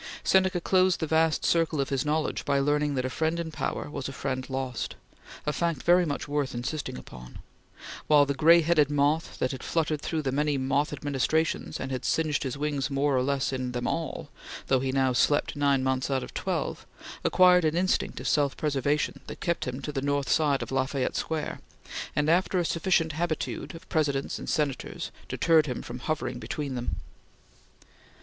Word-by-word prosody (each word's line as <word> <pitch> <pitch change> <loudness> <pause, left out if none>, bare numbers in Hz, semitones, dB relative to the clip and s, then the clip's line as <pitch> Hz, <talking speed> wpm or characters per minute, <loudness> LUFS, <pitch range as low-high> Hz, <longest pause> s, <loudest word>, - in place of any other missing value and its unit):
Seneca 190 -1 +3
closed 185 +1 +3
the 160 - 0
vast 160 0 +2
circle 165 -2 +2
of 135 - 0
his 135 -2 0
knowledge 150 +1 -1
by 140 -1 +1
learning 145 +1 +1
that 130 -1 -1
a - - +1
friend 160 +4 0
in 165 -1 -4
power - - -3
was 140 -2 -5
a - - -5
friend 130 -1 -4
lost 130 -2 -3 0.5
a 150 - 0
fact 170 -2 -1
very 175 0 +4
much 145 - -3
worth 145 -3 -1
insisting 130 +1 -4
upon 60 0 -11 0.7
while 145 -2 +6
the 140 - -1
gray 165 +5 +6
headed 155 -3 +3
moth 145 +2 +1
that 130 - 0
had 130 - -6
fluttered 155 -3 -1
through 160 -2 -2
many 145 +2 +1
moth 135 +2 0
administrations 150 +2 -1
and 130 - -4
had 130 - -3
singed 155 -2 +1
his 135 0 -3
wings 145 -1 -1
more 140 0 +1
or 130 - +3
less 135 0 0
in 130 -1 -3
them 120 0 -3
all, 165 -3 -3 0.4
though 130 - +4
he 130 0 -1
now 130 -1 +2
slept 145 +5 +2
nine 140 -2 +2
months 130 0 0
out 135 -2 0
of - - -9
the - - -3
twelve, - - -3 0.4
acquired 180 -1 +5
an 155 0 +1
instinct 185 +1 0
of - - -4
self 145 -2 +2
preservation 145 -1 0
that - - -8
kept 170 -1 -1
him 125 +2 -5
to 150 - -3
the 135 -2 -2
north 140 -1 0
side 145 -3 +2
of - - -8
La 130 0 +1
Fayette 135 -2 -2
Square, 160 -2 -3 0.6
and, 150 0 +1
after 180 +3 +2
a 175 - +1
sufficient 165 -1 +1
habitude 160 +1 -3
of 175 +3 -12
Presidents 140 -4 0
and - - -6
Senators, 145 -4 -2 0.2
deterred 160 -2 +3
him 125 - -4
from 120 +1 -7
hovering 130 -3 -3
between 135 +4 -4
them. 120 -1 -3
145 Hz, 195 wpm, -27 LUFS, 135-160 Hz, 0.7 s, while